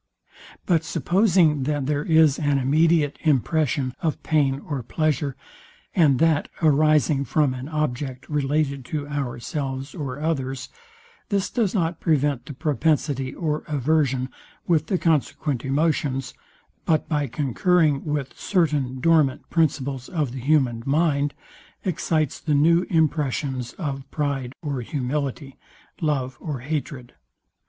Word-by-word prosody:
But 165 -4 +2
supposing 175 - +2
that 145 -1 -1
there 145 +1 0
is 160 -3 +4
an 145 -2 +2
immediate 150 +2 +2
impression 145 -2 +1
of 160 -3 -2
pain 140 -4 +2
or 145 -4 -4
pleasure, 145 +1 -1 0.6
and 150 -7 +4
that 160 -1 +2
arising 150 -2 +3
from 145 -1 +1
an 130 +3 -6
object 140 -4 -3
related 145 -1 0
to 145 +1 -4
ourselves 135 0 -4
or 140 -6 -5
others, 135 -4 -2 0.6
this 200 -2 0
does 225 -5 0
not 165 -3 0
prevent 145 -5 +1
the 145 - -6
propensity 145 -2 0
or 155 -3 -2
aversion, 140 -3 +1 0.4
with 160 -3 +2
the 185 - +1
consequent 150 -5 0
emotions, 135 -3 0 0.5
but 155 -2 +2
by 145 -3 0
concurring 150 +3 +1
with 145 -3 -3
certain 145 -9 0
dormant 155 -4 +2
principles 140 -5 0
of 150 -8 -1
the 130 - -6
human 130 -4 +2
mind, 145 0 +1 0.5
excites 160 -5 0
the 150 -3 0
new 165 +5 +4
impressions 145 -6 0
of 140 -5 -5
pride 140 -4 -2
or 140 -4 -2
humility, 140 +2 -3 0.4
love 135 -5 -1
or 145 -6 -5
hatred. 135 -3 -4
145 Hz, 125 wpm, -24 LUFS, 135-160 Hz, 0.6 s, is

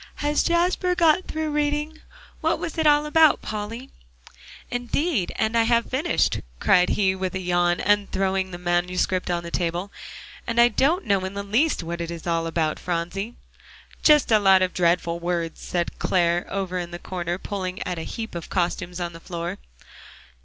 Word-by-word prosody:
"Has 295 0 +1
Jasper 360 +1 +1
got 340 +1 +3
through 315 -1 -3
reading? 295 +1 -1 0.4
What - - +1
was 330 -1 -5
it 315 - +3
all 295 0 +5
about, 315 0 +4
Polly?" 220 +5 -5 0.8
"Indeed 245 - -1
and 220 +2 0
I 230 - +5
have 235 0 +1
finished," 290 +7 +1
he - - -9 0.2
cried 180 -2 +4 0.3
with 185 0 -3
a - - -1
yawn 175 -1 +1
and 205 0 +2
throwing 190 0 0
the 175 - -7
manuscript 180 +1 0
on 175 -1 -1
the 170 - -7
table, 175 +3 -2 0.6
"and 235 0 0
I 240 0 +7
don't 295 - +1
know 200 -3 +1
in 190 +1 -5
the 200 - -3
least 225 - +1
what 170 +1 -4
it 170 - -4
is 170 -1 -7
all 165 -1 0
about, 160 -2 -1
Phronsie." 180 +6 -3 0.7
"Just 300 -5 +5
a 215 - +6
lot 190 -2 +5
of 185 - -1
dreadful 170 -1 +1
words," 170 -1 -3
said 175 -1 -3
Clare 175 -1 +1
over 185 -2 -2
in 175 -1 -5
the 175 - -6
corner, 175 -1 -4
pulling 185 -1 -4
at 180 -2 -4
a - - -4
heap 220 +8 -6
of 170 -2 -6
costumes 180 0 -2
on 175 -1 -3
the 165 - -10
floor. 170 0 -5
190 Hz, 180 wpm, -24 LUFS, 175-245 Hz, 0.8 s, I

